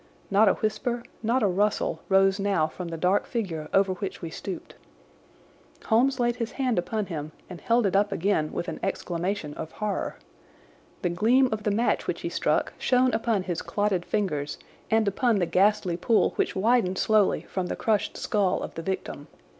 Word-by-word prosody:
Not 205 +1 +5
a - - +4
whisper, 235 +2 -2 0.2
not 235 +3 +1
a - - +4
rustle, 205 +3 0
rose 195 0 +4
now 195 -5 +2
from 175 +3 -6
the 165 -1 -5
dark 180 +5 +1
figure 175 -10 -3
over 195 -1 +3
which 185 +1 -5
we 165 -2 -6
stooped. 185 +2 -7 1.1
Holmes 255 +4 +3
laid 240 0 +1
his 230 -2 -3
hand 255 -7 0
upon 210 +4 -2
him 155 -4 -6 0.2
and 180 - -8
held 235 -1 +2
it 195 - +1
up 200 +1 +3
again 165 -4 0
with 175 - -4
an 165 - -5
exclamation 180 -3 -2
of 160 - -7
horror. 210 -2 -3 0.9
The 175 - +2
gleam 235 +9 +3
of 220 -1 -2
the 210 - 0
match 225 +4 +1
which - - -2
he - - -3
struck - - 0
shone 255 0 +3
upon 220 -3 +1
his 175 -2 -3
clotted 205 -4 0
fingers 150 -9 -2 0.3
and 220 -1 +3
upon 225 +3 +2
the 180 - +2
ghastly 185 +1 +2
pool 220 +5 +2
which - - 0
widened 195 -2 +2
slowly 215 -1 +3
from 185 -2 -4
the - - -3
crushed 215 -3 0
skull 205 -5 0
of - - -6
the 165 - -5
victim. 185 -5 -4
200 Hz, 185 wpm, -26 LUFS, 180-220 Hz, 1.1 s, Not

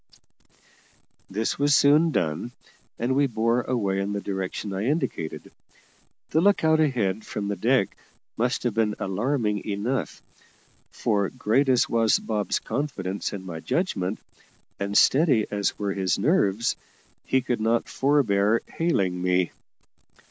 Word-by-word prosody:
This 110 +6 -2
was 145 0 +4
soon 150 +4 +5
done, 85 - -2 0.4
and 125 +3 0
we 140 0 +3
bore 115 0 +1
away 100 -7 -1
in 100 +1 -2
the 100 - -2
direction 95 0 -4
I 95 +3 -2
indicated. 130 - -2 0.8
The 160 - +3
look 200 0 +3
out 160 0 +4
ahead 110 -9 +1
from 105 -1 -4
the 100 - -1
deck 120 -2 +1 0.4
must 120 +2 -1
have 120 -3 0
been 110 -1 +1
alarming 105 +1 -1
enough, 110 +6 -3 0.7
for 100 -4 0
great 130 +2 +1
as 125 -2 +3
was 115 -1 +3
Bob's 105 -2 -1
confidence 100 -10 -3
in 95 -2 -7
my 85 -3 -6
judgment, 100 - -1 0.6
and 100 +1 0
steady 135 -6 +4
as 100 -1 -1
were 100 -2 -2
his 95 -2 0
nerves, 115 - +1 0.5
he 130 - +1
could 120 -3 -2
not 115 +2 +1
forbear 115 -6 +2
hailing 95 - -1
me. 90 -1 +1
110 Hz, 135 wpm, -25 LUFS, 100-130 Hz, 0.8 s, soon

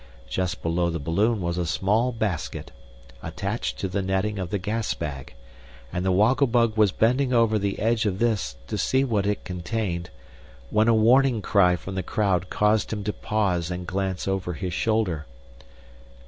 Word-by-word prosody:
Just 90 -1 -2
below 85 +1 +1
the 85 - -2
balloon 100 +9 +1
was 85 0 -2
a 90 - 0
small 105 +9 +1
basket, 110 -8 -3 0.5
attached 100 +4 -3
to 95 - -2
the 95 +2 -2
netting 95 +2 -1
of 90 -2 -3
the 105 - -1
gas 105 +3 -2
bag, 70 -6 -6 0.6
and 90 - -1
the 95 - +2
Woggle 115 +9 +4
Bug 115 -2 +2
was 105 -3 +4
bending 125 +6 +2
over 115 -2 +3
the 100 0 -2
edge 110 +1 +1
of 95 -2 -1
this, 105 - 0
to - - -4
see 130 +1 +2
what 105 -6 0
it 105 - -2
contained, 90 -1 -3 0.6
when 110 +1 +3
a 115 - +5
warning 120 +2 +4
cry 90 -4 +4
from 95 +2 -7
the 95 - -1
crowd 95 -3 0
caused 105 +1 +1
him 105 -2 -3
to 105 +1 -2
pause 95 -6 -1
and 90 0 -4
glance 95 0 -2
over 95 -2 -1
his 90 +1 -4
shoulder. 100 -8 0
100 Hz, 175 wpm, -25 LUFS, 90-110 Hz, 0.6 s, a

